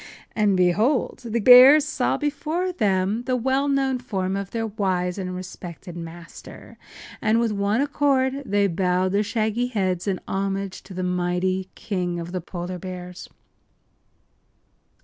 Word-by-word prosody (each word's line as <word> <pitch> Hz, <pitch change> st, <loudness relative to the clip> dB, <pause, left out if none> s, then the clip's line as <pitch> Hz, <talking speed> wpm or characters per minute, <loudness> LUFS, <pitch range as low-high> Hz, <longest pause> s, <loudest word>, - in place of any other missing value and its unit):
And 205 Hz, -3 st, +2 dB
behold! 210 Hz, -, +1 dB
the 230 Hz, 0 st, -1 dB
bears 255 Hz, +6 st, +8 dB
saw 305 Hz, -, 0 dB
before 310 Hz, +5 st, -2 dB
them 205 Hz, -, 0 dB
the 255 Hz, -, 0 dB
well 265 Hz, +3 st, 0 dB
known 270 Hz, -2 st, +1 dB
form 195 Hz, -6 st, -3 dB
of 200 Hz, -1 st, -4 dB
their 225 Hz, +1 st, -3 dB
wise 190 Hz, -3 st, -1 dB
and 185 Hz, -1 st, -4 dB
respected 180 Hz, -1 st, -9 dB
master, 170 Hz, 0 st, -11 dB, 0.4 s
and 220 Hz, 0 st, +2 dB
with 235 Hz, -2 st, +1 dB
one 205 Hz, +4 st, 0 dB
accord 280 Hz, -2 st, +1 dB
they 205 Hz, -5 st, +1 dB
bowed 185 Hz, 0 st, 0 dB
their 200 Hz, +1 st, +2 dB
shaggy 220 Hz, +2 st, -1 dB
heads 190 Hz, -6 st, -1 dB
in 190 Hz, -3 st, -1 dB
homage 195 Hz, 0 st, -3 dB
to 190 Hz, -, -10 dB
the 185 Hz, -, -3 dB
mighty 180 Hz, +1 st, -1 dB
King 180 Hz, -4 st, -3 dB
of 170 Hz, +1 st, -6 dB
the 185 Hz, -1 st, -3 dB
Polar 175 Hz, +1 st, -6 dB
Bears. 180 Hz, 0 st, -8 dB
200 Hz, 145 wpm, -23 LUFS, 180-245 Hz, 0.4 s, bears